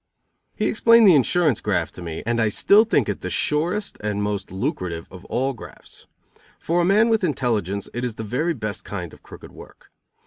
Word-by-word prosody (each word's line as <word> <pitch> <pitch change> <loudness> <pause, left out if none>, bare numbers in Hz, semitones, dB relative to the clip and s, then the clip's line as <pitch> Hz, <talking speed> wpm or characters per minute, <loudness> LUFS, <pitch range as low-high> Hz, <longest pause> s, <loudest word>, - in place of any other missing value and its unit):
He - - -1
explained 230 -1 +5
the 185 - +8
insurance 150 - +2
graft 90 -6 -1
to - - -11
me, 80 -2 -6
and 120 +1 0
I 110 -1 +2
still 205 - +4
think 145 - +1
it 100 - -3
the 90 - -4
surest 175 - -1
and 105 -1 -1
most 100 -2 -3
lucrative 90 -3 -4
of 90 -1 -12
all 135 +2 -1
grafts. 115 - -12 0.5
For 175 +2 0
a - - +2
man 210 +5 +4
with 225 -3 +1
intelligence 110 - -1
it 120 - -4
is 120 -3 -3
the 110 - -6
very 155 +10 -1
best 110 -4 -5
kind 90 -5 -6
of - - -16
crooked - - -13
work. - - -15
120 Hz, 200 wpm, -22 LUFS, -, 0.5 s, the